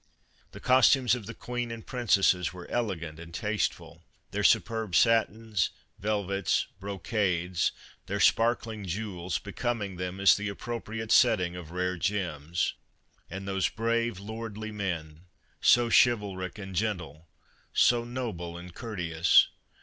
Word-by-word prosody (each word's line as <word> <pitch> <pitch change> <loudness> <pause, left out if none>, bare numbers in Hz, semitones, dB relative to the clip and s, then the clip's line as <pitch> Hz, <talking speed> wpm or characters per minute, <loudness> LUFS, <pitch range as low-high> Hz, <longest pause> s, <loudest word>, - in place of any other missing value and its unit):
The - - -10
costumes 130 -1 +5
of 120 -5 -3
the 115 - -7
Queen 120 -1 -4
and 115 -1 -7
Princesses 100 -8 +2
were 90 -1 -10
elegant 85 -9 -3
and 85 0 -10
tasteful, 105 +4 -2 0.3
their - - -2
superb 110 -5 +2
satins, 115 -3 +2 0.3
velvets, 100 -3 0
brocades, 95 -2 -1 0.4
their - - -2
sparkling 115 -3 +2
jewels, 90 -3 -3
be 100 +5 -9
coming 105 -6 -2
them 90 +1 -4
as 100 - +7
the 105 0 -3
appropriate 110 +1 -5
setting 90 -8 +4
of 90 -3 -8
rare 90 +1 -2
gems. 85 -4 -1 0.6
And 95 +2 -6
those 95 -3 +1
brave, 115 -2 -1
lordly 110 +1 -6
men! 85 -5 -4 0.4
so 120 -1 +5
chivalric 100 -6 +2
and 95 -2 -7
gentle, 85 -6 -3 0.4
so 120 -1 +4
noble 110 -9 -5
and 85 0 -10
courteous. 90 -7 +3
100 Hz, 125 wpm, -28 LUFS, 90-115 Hz, 0.6 s, as